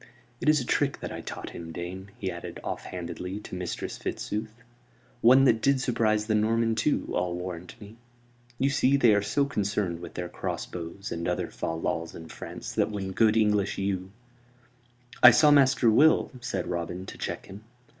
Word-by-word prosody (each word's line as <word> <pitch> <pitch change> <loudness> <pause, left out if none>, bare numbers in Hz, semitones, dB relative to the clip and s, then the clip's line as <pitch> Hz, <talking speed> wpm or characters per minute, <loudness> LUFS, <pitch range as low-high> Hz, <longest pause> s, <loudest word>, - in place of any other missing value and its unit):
"It - - +2
is 155 -1 +5
a 125 - -4
trick 140 +3 0
that - - -5
I - - -6
taught - - -7
him, 85 -1 -8
dame," 90 +3 -6
he 95 -6 -3
added, 85 0 -7
off - - -4
handedly, 90 +2 -5
to - - -11
Mistress 90 -1 -4
Fitzooth. 110 +1 -3 0.7
"One 130 +3 +7
that 115 -4 +4
did 140 -1 +3
surprise 110 -5 +1
the 110 - 0
Norman 115 +2 +2
too, 115 +7 0
I'll 90 -1 0
warrant 90 +3 -7
me. 105 +1 -12 0.6
You 135 +2 +2
see, 140 0 +3
they 120 -5 +5
are 105 - +3
so 110 +8 +1
concerned 100 -8 -1
with - - -9
their 90 0 -3
crossbows 90 +2 -5
and 85 0 -3
other - - -2
fal 80 0 -3
lals 80 0 -3
in 80 -1 -10
France - - -7
that - - +1
when 100 -3 -4
good 110 +2 +3
English 105 -2 +2
yew 95 -1 -2 0.6
" 120 0 -34 0.3
"I 120 - +12
saw 150 +5 +6
Master 135 -3 +5
Will," 155 +8 +4
said 125 +1 -3
Robin, 90 +1 -4
to - - -9
check - - -4
him. 100 +2 -11
105 Hz, 185 wpm, -27 LUFS, 90-120 Hz, 0.7 s, I